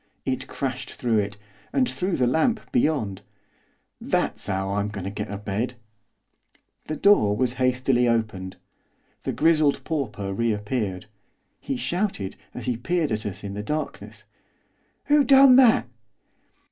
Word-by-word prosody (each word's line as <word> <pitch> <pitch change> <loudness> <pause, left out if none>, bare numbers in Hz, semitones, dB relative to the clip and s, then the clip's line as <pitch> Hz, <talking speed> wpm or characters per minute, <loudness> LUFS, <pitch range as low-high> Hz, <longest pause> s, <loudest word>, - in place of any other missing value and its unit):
It 130 -1 -2
crashed 130 -2 -4
through 115 -3 +1
it, 105 0 -3 0.3
and 260 -2 +2
through 185 -5 -2
the 125 - +2
lamp 160 - +1
beyond. 145 - 0 0.8
'That's - - -1
'ow 95 0 -1
I'm 100 0 0
goin' 100 -3 -6
to 95 - -4
get 105 +1 -5
a 100 - -4
bed.' 105 +5 -3 1.1
The 155 - -3
door 140 - +4
was 125 0 +1
hastily 125 -1 +2
opened. 110 -5 -1 0.7
The - - 0
grizzled 155 -3 +2
pauper 125 -11 -3
reappeared. 105 -2 -2 0.5
He 270 -1 -3
shouted, 180 - -2 0.2
as - - -7
he 125 -2 -1
peered 165 +4 -1
at 110 -1 -2
us 100 - -7
in 100 -1 -5
the 105 - -4
darkness, 150 +8 -5 0.8
'Who 295 0 +4
done 270 -1 +7
that? 245 - +5
125 Hz, 140 wpm, -24 LUFS, 105-160 Hz, 1.1 s, done